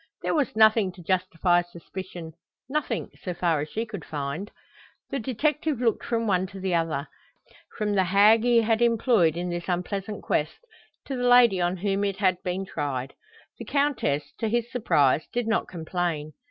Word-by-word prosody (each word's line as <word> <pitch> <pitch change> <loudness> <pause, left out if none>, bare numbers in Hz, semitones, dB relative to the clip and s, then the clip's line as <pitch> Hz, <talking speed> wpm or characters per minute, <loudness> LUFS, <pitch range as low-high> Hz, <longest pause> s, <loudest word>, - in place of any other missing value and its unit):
There - - 0
was 290 -8 0
nothing 215 -3 +5
to 175 - -13
justify 180 -1 +2
suspicion, 175 -1 -9 0.3
nothing, 270 -5 -2
so 180 -2 -4
far 170 -3 +1
as 150 - -5
she 225 +2 -3
could 205 -7 -7
find. 150 +7 -4 0.6
The 275 - -1
detective 285 +4 -1
looked 235 -3 +1
from 230 -1 -1
one 190 -3 +1
to 195 0 -10
the 190 -1 -1
other 165 -4 0 0.7
from 210 -2 0
the 190 -2 +3
hag 205 +5 +5
he 240 -1 +4
had 225 +1 +1
employed 230 - +3
in 175 0 -3
this 175 +1 -5
unpleasant 195 +3 -3
quest, 150 +1 -1 0.5
to 275 - -4
the 245 -1 0
lady 240 -7 +6
on 175 +1 0
whom 195 +2 -1
it 200 -1 -1
had 185 -3 +1
been 185 +2 -3
tried. 135 -6 -4 0.5
The - - -7
Countess, 280 - 0
to 225 - 0
his 235 +1 -1
surprise, 150 - +2
did 245 -1 -1
not 225 - +1
complain. 165 -3 -3
190 Hz, 175 wpm, -26 LUFS, 175-230 Hz, 0.7 s, lady